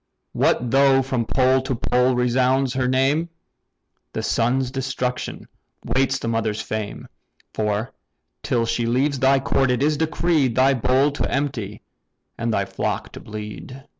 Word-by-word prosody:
What 120 -1 +1
though 135 0 +4
from 125 -3 -2
pole 130 +1 +3
to 130 0 -2
pole 125 +2 +1
resounds 130 +2 +2
her 130 -1 0
name! 135 +6 +1 0.8
The - - -3
son's 125 +2 +1
destruction 130 -1 -3 0.4
waits 135 +1 +1
the 115 - -5
mother's 115 -2 -1
fame: 110 -1 -5 0.5
For, 105 +2 -2 0.5
till 115 -2 0
she 115 0 -1
leaves 135 +3 +1
thy 135 +1 +4
court, 135 0 +1
it 125 +1 +1
is 150 0 +2
decreed, 155 -5 +1
Thy 135 +1 +4
bowl 130 +3 +2
to 145 - -3
empty 125 -8 -3 0.5
and 115 0 -2
thy 100 -2 0
flock 95 0 -3
to - - -9
bleed." 105 +5 -8
130 Hz, 145 wpm, -22 LUFS, 115-135 Hz, 0.8 s, though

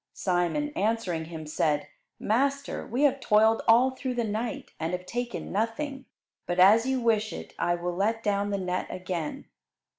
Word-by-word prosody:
Simon, 180 - 0
answering 210 - -1
Him, 160 -1 -7
said, 150 -1 0 0.3
"Master, 275 +5 0
we 250 +6 0
have 275 -1 +3
toiled 220 -1 +4
all 245 +3 +6
through 260 -1 -4
the 240 - 0
night 220 +2 -3
and 165 +2 -2
have 180 0 -3
taken 240 +4 -4
nothing, 260 +6 -2 0.4
but 175 - -1
as 215 +6 +6
you 265 -1 +1
wish 220 -2 +1
it - - -8
I 175 - +2
will 175 0 -3
let 220 +4 0
down 205 -1 0
the 200 - -1
net 185 -1 -2
again." 180 -4 -4
215 Hz, 170 wpm, -27 LUFS, 180-245 Hz, 0.4 s, all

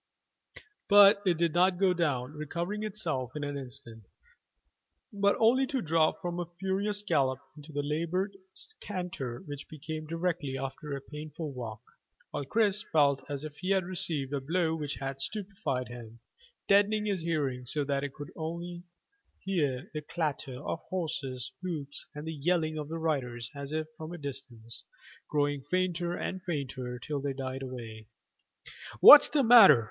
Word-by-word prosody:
But 200 0 +8
it 175 -3 +3
did 170 -1 +1
not 180 +1 +4
go 190 -1 +4
down, 145 -6 -1
recovering 170 +7 -3
itself 170 - -3
in 150 - -3
an 145 0 -3
instant, 115 -5 -8 1.1
but 200 0 +3
only 255 +4 +4
to 270 -2 -1
drop 160 -5 +1
from 175 0 -2
a 175 - -3
furious 200 +2 -1
gallop 130 -8 +2 0.2
into 150 +1 -12
a 145 - -1
laboured 170 +6 -1 0.4
canter 170 - -5
which 145 -2 -8
became 155 +1 -6
directly 165 -4 -2
after 135 +2 -5
a - - -9
painful 150 +1 -7
walk, 115 -2 -7 0.5
while 145 - -3
Chris 210 +4 +2
felt 140 -3 +3
as 145 0 -4
if 150 -1 -8
he 185 - -4
had 195 -1 +3
received 155 -6 0
a 140 - -1
blow 165 +3 +1
which 150 -3 -3
had 135 0 -5
stupefied 185 - -3
him, 120 -1 -10 0.5
deadening 205 +1 +4
his 200 -4 -1
hearing 140 -7 -1
so 145 +3 -1
that 140 0 0
he 145 - -2 0.3
only 170 +2 -5 0.7
heard 150 -5 -1
the 155 - -3
clatter 145 -5 -3
of - - -2
horses' 135 -8 -3
hoofs 155 -6 -5
and 150 +1 -6
the 160 - -4
yelling 155 +1 0
of 150 -1 -5
the 165 - -3
riders 125 -7 -2
as 140 0 -7
if 155 0 -1
from 160 +1 -7
a - - -6
distance, 130 -6 -7 0.5
growing 145 -1 +1
fainter 180 -1 0
and 190 +1 -4
fainter 135 -7 -4
till 145 +2 -4
they 140 0 -2
died 130 0 -4
away. 115 -4 -7 0.9
"What's 290 - +12
the 290 -2 +2
matter? 225 - +9
155 Hz, 160 wpm, -30 LUFS, 135-180 Hz, 1.1 s, What's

